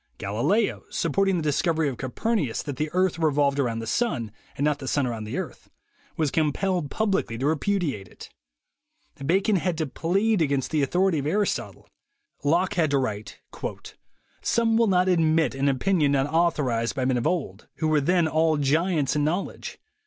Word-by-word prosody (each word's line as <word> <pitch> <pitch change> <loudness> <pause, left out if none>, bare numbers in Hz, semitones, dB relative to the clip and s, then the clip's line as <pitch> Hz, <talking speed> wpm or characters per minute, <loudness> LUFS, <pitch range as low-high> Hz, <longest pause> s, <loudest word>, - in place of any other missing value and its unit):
Galileo, 120 - 0
sup 165 -3 -2
porting 195 +2 +2
the 165 - -2
discovery 155 +1 +1
of 135 - -2
Copernicus 140 - -2
that 145 -4 -5
the 155 +2 -1
earth 185 -2 +1
revolved 145 -3 +2
around 120 -4 0
the 115 - -4
sun, 120 - -1 0.3
and 145 - 0
not 150 -1 +1
the 135 - -7
sun 140 +1 +1
around 115 -3 -4
the 105 - -4
earth, - - -6 0.5
was 155 -4 +1
compelled 160 +1 0
publicly 195 - -1
to 130 - -2
repudiate 155 - -1
it. - - -13 0.9
Bacon 190 +7 +2
had 175 -1 -1
to 160 - 0
plead 195 - 0
against 140 -4 0
the 155 -2 +1
authority 175 +4 +2
of 140 - -3
Aris 205 +6 +2
totle. - - -8 0.6
Locke 170 +6 +2
had 165 -4 +1
to 140 - +2
write: 110 -6 -4 1.0
"Some 230 -1 +2
will 230 0 +4
not 185 -1 +3
admit 160 -5 +3
an 135 +1 +1
opinion 150 +1 +2
not 135 -1 +2
authorized 140 -9 +1
by 130 -2 -1
men 130 -1 +1
of 120 - 0
old, 135 - -3
who 160 - -1
were 155 -1 +3
then 175 +2 +2
all 160 0 +2
giants 150 +1 +1
in 150 - +1
knowledge. 175 +6 -3
155 Hz, 180 wpm, -25 LUFS, 135-180 Hz, 1.0 s, will